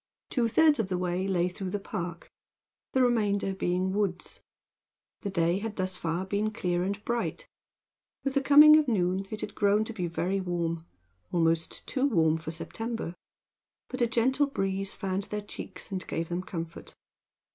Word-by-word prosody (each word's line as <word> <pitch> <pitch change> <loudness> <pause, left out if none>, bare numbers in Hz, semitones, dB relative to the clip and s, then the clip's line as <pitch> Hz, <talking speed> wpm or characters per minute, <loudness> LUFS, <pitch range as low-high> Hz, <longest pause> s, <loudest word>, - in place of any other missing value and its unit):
Two 240 -3 +2
thirds 305 +4 +4
of 220 - +1
the 185 -1 -1
way 180 +1 -1
lay 180 -2 +2
through 185 +1 -5
the 205 - -2
park, 175 -4 -5 0.7
the 260 - +4
remainder 205 -5 +2
being 185 0 0
woods. 200 -3 -2 0.8
The 200 - -3
day 170 -1 +1
had 220 0 -4
thus 185 -1 -1
far 170 +1 -2
been 205 +3 0
clear 180 -4 -1
and 200 +3 -3
bright. 240 - -2 0.8
With 275 - -1
the 275 - +2
coming 300 +2 +9
of 305 -2 +2
noon 190 -3 +1
it 215 - -5
had - - -5
grown 205 +1 +3
to 230 - -5
be 180 -5 -2
very 180 +4 -1
warm 170 -2 -2 0.4
almost 165 -1 +1
too 270 0 +1
warm 160 - +3
for 160 - -6
September 225 +4 -4 0.8
but 255 0 -4
a 240 - +4
gentle 260 +5 +2
breeze 195 -5 -1
fanned 195 0 -2
their 210 - -3
cheeks 205 +1 -8
and 185 -1 -4
gave 165 0 -3
them 175 +1 -1
comfort. 165 -3 -7
195 Hz, 170 wpm, -29 LUFS, 175-225 Hz, 0.8 s, coming